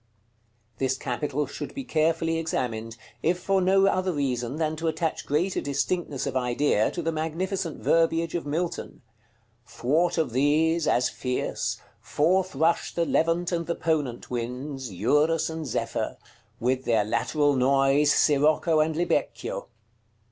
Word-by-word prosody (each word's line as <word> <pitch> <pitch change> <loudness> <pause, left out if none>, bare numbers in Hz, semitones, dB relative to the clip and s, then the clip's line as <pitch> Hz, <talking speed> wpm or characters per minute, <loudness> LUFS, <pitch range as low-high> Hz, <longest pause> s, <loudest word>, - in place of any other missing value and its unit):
This 130 0 0
capital 145 +4 -2
should - - -7
be 275 - -4
carefully 165 -4 +1
examined, 115 -7 -3 0.2
if 175 +2 +1
for 195 +1 +1
no 195 +1 +4
other 185 -1 +1
reason 130 -4 -2
than 155 0 -1
to 165 +1 -2
attach 160 0 -2
greater 170 +6 0
distinctness 145 +1 -2
of - - -3
idea 125 -3 +2
to 175 - -5
the 165 - 0
magnificent 165 +2 -3
verbiage 165 0 +2
of 170 - -2
Milton: 160 0 -4 0.6
"Thwart 160 +9 0
of 160 -6 0
these, 155 +5 +2
as 125 0 +3
fierce, 125 -1 -2 0.2
Forth 185 +3 +1
rush 160 +4 +1
the 170 - +1
Levant 165 +2 +1
and 170 -1 -2
the 170 - -1
Ponent 150 -9 -2
winds, 125 +1 -4
Eurus, 150 - +2
and 160 -2 -5
Zephyr; 120 - -2 0.4
with 130 +2 0
their 115 -3 +3
lateral 145 +6 +1
noise, 135 +3 +3
Sirocco 155 +2 +3
and 155 0 +1
Libecchio." 175 +2 -1
155 Hz, 140 wpm, -26 LUFS, 135-165 Hz, 0.6 s, no